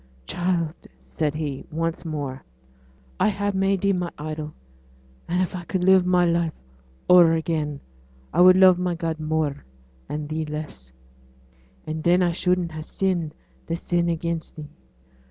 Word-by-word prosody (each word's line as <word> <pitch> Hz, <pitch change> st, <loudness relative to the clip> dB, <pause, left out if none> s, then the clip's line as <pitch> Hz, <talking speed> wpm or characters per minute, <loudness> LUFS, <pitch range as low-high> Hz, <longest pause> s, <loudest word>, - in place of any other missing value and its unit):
'Child,' 175 Hz, -, -2 dB, 0.2 s
said 150 Hz, -2 st, -2 dB
he, 145 Hz, -4 st, -4 dB
once 165 Hz, +1 st, -2 dB
more. 145 Hz, -5 st, -4 dB, 0.8 s
'I -, -, +4 dB
ha' 205 Hz, 0 st, -1 dB
made 195 Hz, 0 st, +1 dB
thee 200 Hz, 0 st, +2 dB
my 180 Hz, -2 st, -1 dB
idol; 155 Hz, 0 st, -5 dB, 0.8 s
and 180 Hz, +2 st, +1 dB
if 185 Hz, -, -4 dB
I 180 Hz, -, -5 dB
could 180 Hz, +1 st, -2 dB
live 190 Hz, -1 st, +5 dB
my 180 Hz, -1 st, +4 dB
life 170 Hz, -1 st, +1 dB, 0.5 s
o'er 175 Hz, -2 st, +7 dB
again 155 Hz, -3 st, -1 dB, 0.5 s
I -, -, +4 dB
would 185 Hz, 0 st, +8 dB
love 185 Hz, -1 st, +6 dB
my 180 Hz, -1 st, 0 dB
God 165 Hz, -1 st, -3 dB
more, 155 Hz, -2 st, -1 dB, 0.5 s
and 150 Hz, 0 st, -4 dB
thee 155 Hz, +1 st, -2 dB
less; 150 Hz, -, -7 dB, 0.9 s
and 155 Hz, 0 st, -4 dB
then 180 Hz, +1 st, +4 dB
I 175 Hz, -, +2 dB
shouldn't 180 Hz, 0 st, 0 dB
ha' 155 Hz, 0 st, -6 dB
sinned 175 Hz, -4 st, -1 dB, 0.3 s
this 165 Hz, +1 st, -4 dB
sin 175 Hz, -1 st, +1 dB
against 170 Hz, 0 st, -3 dB
thee. 150 Hz, -2 st, -9 dB
170 Hz, 155 wpm, -24 LUFS, 155-180 Hz, 0.9 s, would